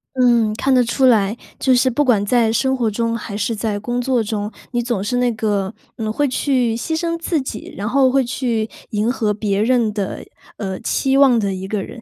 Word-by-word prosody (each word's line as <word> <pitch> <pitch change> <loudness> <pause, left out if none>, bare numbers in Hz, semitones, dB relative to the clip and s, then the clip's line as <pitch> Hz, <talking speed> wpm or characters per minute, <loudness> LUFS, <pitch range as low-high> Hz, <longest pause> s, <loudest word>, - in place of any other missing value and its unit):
嗯， 240 -4 +3
看 270 +3 +1
得 250 - +5
出 245 +3 +1
来， 220 -2 +3 0.2
就 260 -1 +3
是 255 +1 +3
不 290 +5 +1
管 225 -7 +2
在 230 0 +2
生 265 +4 +1
活 240 -4 0
中 230 +2 -1
还 210 -2 -5
是 220 +2 -1
在 210 -1 -2
工 240 +4 -2
作 245 -2 +1
中， 210 0 -3 0.2
你 240 -1 0
总 235 -5 -2
是 245 +4 -1
那 245 -1 +2
个， 210 -2 -1 0.2
嗯， 220 -1 -2
会 290 +5 +1
去 250 -3 +1
牺 320 +7 -2
牲 335 0 -1
自 335 -1 0
己， 260 -5 -7
然 205 +1 -3
后 265 +2 +3
会 270 +1 +2
去 235 -3 -1 0.2
迎 215 +3 +1
合 220 -5 0
别 205 -1 -1
人 230 -2 +2
的， 200 -2 -4 0.3
呃， 190 -3 -4
期 270 0 0
望 265 -4 +6
的 200 -2 -1
一 190 0 -5
个 200 -1 -2
人。 235 - -10
230 Hz, 235 characters per minute, -19 LUFS, 210-255 Hz, 0.3 s, 望